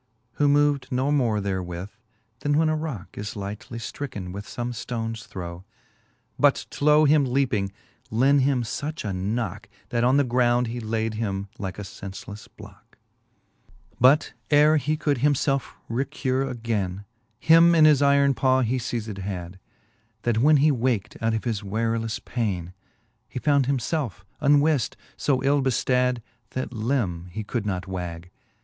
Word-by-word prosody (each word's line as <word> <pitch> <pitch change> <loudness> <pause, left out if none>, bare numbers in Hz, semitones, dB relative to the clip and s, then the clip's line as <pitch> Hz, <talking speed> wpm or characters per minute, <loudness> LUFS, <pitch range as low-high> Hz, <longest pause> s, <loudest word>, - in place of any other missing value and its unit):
Who 145 - +5
mov'd 145 -2 +3
no 130 +3 +1
more 120 -7 +2
therewith, 95 -1 -4 0.5
then 145 0 +1
when 160 0 +3
a 155 - +1
rocke 150 - -5
Is 105 0 -5
lightly 105 +3 -6
ftricken 115 -6 -6
with 100 +2 -7
fom3 120 0 -4
ftonss 115 -1 -5
throw; 85 -1 -7 0.8
But - - +3
to 150 +1 +4
him 150 0 +5
leaping, 125 -7 0 0.4
lent 135 +5 +4
him 130 -2 +2
fuch 145 +2 -4
a 100 - -2
knocke, 100 +2 -3 0.2
That 120 -1 0
on 130 +3 +4
the 145 - +4
ground 120 -1 +2
he 120 +1 -4
laid 110 0 -2
him 100 -3 -3
like 95 -2 -4
a 105 - -5
fencelefle 100 +2 -9
blocke. - - -15
XXII. - - -35
But 135 +5 +5 0.2
ere 150 +1 +5
he 150 +2 0
could 145 -4 0
him 145 +2 +3
felfe 135 0 -1
recure 135 +1 -1
againe, 105 -6 -3 0.3
Him 165 +5 +6
in 155 -2 +7
his 150 -3 +5
iron 140 0 +4
paw 130 +2 +2
he 130 +2 0
lei 120 0 -2
zed 105 -2 -7
had, 95 -1 -6 0.6
That 115 -2 +1
when 150 +5 +5
he 155 - +5
wak't 120 -5 -1
out 115 0 +1
of 110 - -3
his 115 -4 -2
warelefle 115 +2 -2
paine. 95 -8 -2 0.6
He - - -7
found 140 0 +2
him 140 0 +2
felfe 120 - -3 0.2
unwift, 145 -2 +3 0.2
fb 130 -3 +1
ill 140 +1 +3
beftad, 125 -1 +1 0.3
That 130 - -3
lim 110 -7 -1
he 110 +5 -6
could 105 0 -3
not 90 -3 -2
wag. 90 -2 -6
120 Hz, 160 wpm, -25 LUFS, 105-140 Hz, 0.8 s, in